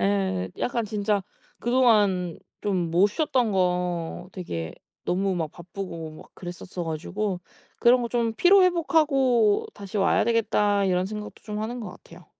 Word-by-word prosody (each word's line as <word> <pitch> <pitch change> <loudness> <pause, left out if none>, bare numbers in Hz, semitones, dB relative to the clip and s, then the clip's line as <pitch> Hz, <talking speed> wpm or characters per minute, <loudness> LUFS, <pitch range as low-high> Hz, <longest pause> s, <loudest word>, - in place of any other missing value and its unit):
예 95 -2 0
약간 235 -2 -1
진짜 210 -1 0 0.4
그동안 210 -8 +3 0.2
좀 185 -5 -1
못 185 +4 +5
쉬었던 250 -1 +1
거 180 -2 -1
되게 85 - -5 0.3
너무 190 +1 0
막 160 -4 -2
바쁘고 170 -2 -7
막 - - -16
그랬었어 175 0 -7
가지고 180 +4 -3 0.4
'그런 245 +1 +5
거 235 - -2
좀 230 -1 0
피로 375 - +6
회복하고 280 - +3
다시 200 0 -7
와야 195 - +3
되겠다.' 210 -3 +2
이런 185 -1 +1
생각도 210 +1 -7
좀 210 -1 -5
하는 240 +3 -4
것 220 - -6
같아요. - - -15
200 Hz, 285 characters per minute, -25 LUFS, 180-230 Hz, 0.4 s, 피로